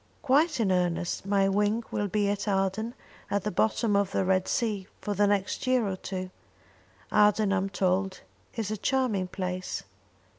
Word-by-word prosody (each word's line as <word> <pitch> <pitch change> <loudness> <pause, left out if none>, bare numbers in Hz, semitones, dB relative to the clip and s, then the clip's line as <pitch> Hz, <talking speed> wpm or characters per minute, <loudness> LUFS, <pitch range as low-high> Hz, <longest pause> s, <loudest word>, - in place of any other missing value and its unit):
"Quite 295 +2 +3
in 205 -4 +2
earnest. 180 +1 0
My 195 -1 +3
wing 210 +3 +1
will 205 - -1
be 205 +1 +1
at 205 +1 -1
Aden, 195 +4 0 0.3
at 200 -1 0
the 210 - -1
bottom 215 +2 +1
of 200 -1 +2
the 190 - 0
Red 185 0 +2
Sea, 210 -5 -1
for 205 - -3
the 205 +1 +3
next 200 +4 0
year 255 -4 +3
or 190 - -2
two. 185 0 -5 0.8
Aden, 210 -1 +4
I'm 195 0 0
told, 190 0 0 0.3
is 220 -3 -2
a 215 - -2
charming 235 -6 0
place." 185 0 -4
200 Hz, 165 wpm, -28 LUFS, 190-215 Hz, 0.8 s, Aden